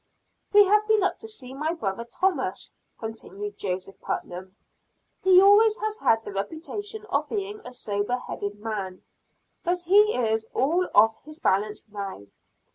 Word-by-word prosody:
"We 415 0 +8
have 420 +2 +3
been 435 -3 +3
up 380 - 0
to 445 - -8
see 265 - -9
my 305 +4 -2
brother 225 - -3
Thomas," 265 - -2 0.2
continued 210 -2 -6
Joseph 190 0 -4
Putnam. 185 +2 -5 0.7
"He 370 -1 +7
always 420 +3 +6
has 435 -2 -3
had 225 0 +2
the - - -6
reputation 405 - -5
of 295 +2 0
being 415 0 -3
a 250 - -7
sober 210 0 -2
headed 205 -4 -6
man, 205 -4 -5 0.6
but 355 0 0
he 415 +5 +5
is 220 -2 0
all 335 +8 +1
off 220 +2 +5
his 305 0 -11
balance 210 - 0
now." 200 - -7
255 Hz, 150 wpm, -26 LUFS, -, 0.7 s, We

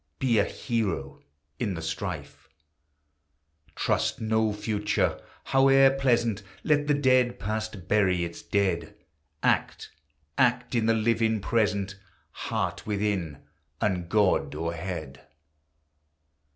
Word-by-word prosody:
Be 120 -5 +2
a 100 - +3
hero 100 - -3 0.4
in 100 -4 -1
the 85 - -5
strife! 80 -2 -5 1.3
Trust - - 0
no 110 0 +1
Future, 105 0 -1 0.2
howe'er 135 0 +5
pleasant! 120 -5 +1 0.2
Let 145 -1 +2
the 145 - +3
dead 130 -3 +3
Past 110 -3 -4
bury 95 -4 +2
its 85 0 -6
dead! 90 -5 -1 0.5
Act, - - 0 0.2
— 75 - -46 0.2
act 125 -1 +2
in 115 -2 +1
the 115 - +4
living 110 0 +1
Present! 100 -3 0 0.3
Heart - - -3
within, 100 -8 -2 0.4
and 90 -4 -1
God 100 -6 +2
o'erhead! 80 -3 -5
105 Hz, 110 wpm, -27 LUFS, 90-115 Hz, 1.3 s, howe'er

